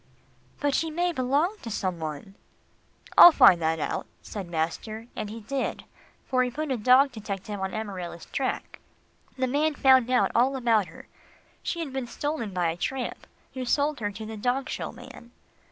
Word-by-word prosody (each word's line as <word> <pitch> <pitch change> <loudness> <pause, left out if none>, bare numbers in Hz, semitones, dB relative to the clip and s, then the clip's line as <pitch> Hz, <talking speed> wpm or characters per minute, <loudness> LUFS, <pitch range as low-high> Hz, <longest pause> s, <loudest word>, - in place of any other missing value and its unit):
"But 285 -1 0
she 325 +4 +1
may 350 +3 0
belong 295 +8 0
to 235 - -7
some 185 -5 -2
one." 155 +4 -6 0.9
"I'll 350 - +12
find 180 - +6
that 160 0 +1
out," - - -3 0.2
said 200 -4 -6
master, 175 +7 -3
and 210 - -4
he 225 +2 -8
did, 265 +5 -3 0.4
for 255 -1 +1
he 250 - +1
put 300 +3 -4
a 260 - 0
dog 255 +5 +5
detective 205 -2 -6
on 190 +1 -3
Amarilla's 185 -6 -6
track. 265 -1 -3 0.6
The 260 - +1
man 295 +4 +1
found 260 -3 +5
out 255 - +3
all 255 +3 +3
about 230 -6 +2
her. - - -13 0.5
She 340 - -3
had 285 -5 -5
been 265 -2 -3
stolen 290 -5 -3
by 175 -3 0
a 165 - -7
tramp, 260 +7 -4 0.3
who 260 - -4
sold 285 +3 +1
her 205 -2 -1
to 215 +2 -8
the 220 0 -7
dog 250 +5 -1
show - - -4
man. 235 - -13
245 Hz, 180 wpm, -26 LUFS, 200-275 Hz, 0.9 s, I'll